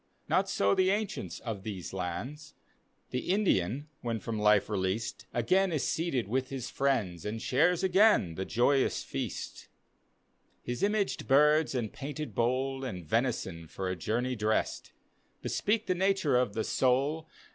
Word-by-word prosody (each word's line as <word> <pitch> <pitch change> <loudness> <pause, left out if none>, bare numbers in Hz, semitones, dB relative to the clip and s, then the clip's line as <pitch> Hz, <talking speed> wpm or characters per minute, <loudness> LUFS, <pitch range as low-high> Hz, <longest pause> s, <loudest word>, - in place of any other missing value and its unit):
Not - - +2
so 100 0 +2
the 185 0 +3
ancients 205 0 -2
of 110 -5 -4
these 95 -4 -6
lands; 110 - -5 0.3
— - - -43
The 125 - -3
Indian, 145 - +1
when 115 -2 -2
from 110 0 -4
life 105 -1 +4
released, 100 +2 -2
Again 185 +11 +2
is 155 -4 0
seated 160 -8 0
wi^ 130 +5 -1
his 135 -3 -5
friends, 115 - 0
And 110 +2 -3
^ares 165 +9 +2
again 190 - +4
die 95 - -3
joyous 130 +5 +2
feast, - - -5 1.0
His 120 0 -4
imaged 205 0 0
birds 150 +2 +4
and 115 -4 -2
painted 145 -1 -5
bowl, 130 +4 0
And 90 -10 -5
venison, 95 -5 -1
for 95 +4 -4
a 95 - -1
journey 120 +8 -1
dressed, 110 0 -1 0.5
Bespeak 215 +1 0
the - - +1
nature 190 -5 +2
of 125 -4 +2
the 110 - 0
soul. 140 +7 +1
125 Hz, 150 wpm, -30 LUFS, 105-155 Hz, 1.0 s, life